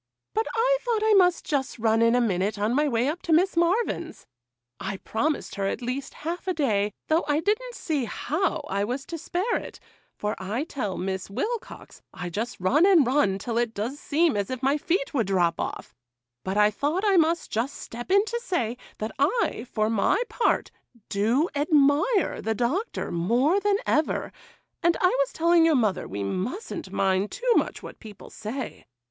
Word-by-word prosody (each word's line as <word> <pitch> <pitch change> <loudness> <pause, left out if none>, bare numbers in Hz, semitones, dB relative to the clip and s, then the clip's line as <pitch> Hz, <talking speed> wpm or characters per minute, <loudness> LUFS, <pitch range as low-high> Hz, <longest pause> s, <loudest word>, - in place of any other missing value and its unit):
but 440 +1 0
I - - +3
thought 460 -3 0
I 435 0 +4
must 360 -3 +4
just 275 -3 -1
run 225 0 +2
in 230 +1 +4
a 245 - +3
minute 200 -1 0
on 210 +3 0
my 295 +3 +2
way 240 -1 +1
up 315 +5 -2
to 335 - -3
Miss 355 +4 +4
Marvyn's. 340 -1 0 0.5
I 195 0 -4
promised 285 +10 -2
her 195 -1 -1
at 220 - -3
least 255 +3 -4
a - - -17
half 340 +4 -5
a 370 - 0
day, 210 -9 +1 0.2
though 320 +2 +2
I 295 0 +2
didn't 450 +8 -1
see 295 -6 -1
how 320 - -2
I 200 +1 -1
was 255 +6 -3
to 330 - -6
spare 380 +10 -1
it,—for 210 +1 -7
I 210 +9 -2
tell 250 - -4
Miss 190 0 -3
Wilcox 420 - -5
I 175 -1 -5
just 225 +7 -4
run 250 - +3
and 350 -8 +6
run 245 -7 +2
till 230 +3 -2
it 235 -2 -1
does 240 +8 -3
seem 315 -1 +2
as 200 -1 -1
if 255 0 -5
my 275 +2 +3
feet 310 0 -1
would 230 -8 +1
drop 175 -4 +1
off; - - -5 0.5
but 190 +2 -2
I 210 0 +5
thought 295 - -1
I 400 -2 +4
must 330 0 +2
just 245 +6 -1
step 240 +1 -8
in 400 +2 +4
to 470 +1 -3
say, 245 - -1 0.2
that 215 +1 -4
I, 295 - +1
for 215 -1 +1
my 225 - +2
part, 475 - +1 0.4
do 230 - +2
admire 295 - +2
the 220 0 -1
Doctor 290 - -1
more 240 - +2
than 405 0 +2
ever, 310 - 0 0.5
and 340 0 +3
I 365 - +4
was - - +1
telling 335 0 +4
your 325 -2 +4
mother 215 -7 +1
we 100 +1 -4
mus'n't 205 - -4
mind 190 +1 +1
too - - +1
much - - 0
what - - -10
people 210 -4 -12
say. 235 +4 -6
275 Hz, 190 wpm, -26 LUFS, 215-345 Hz, 0.5 s, and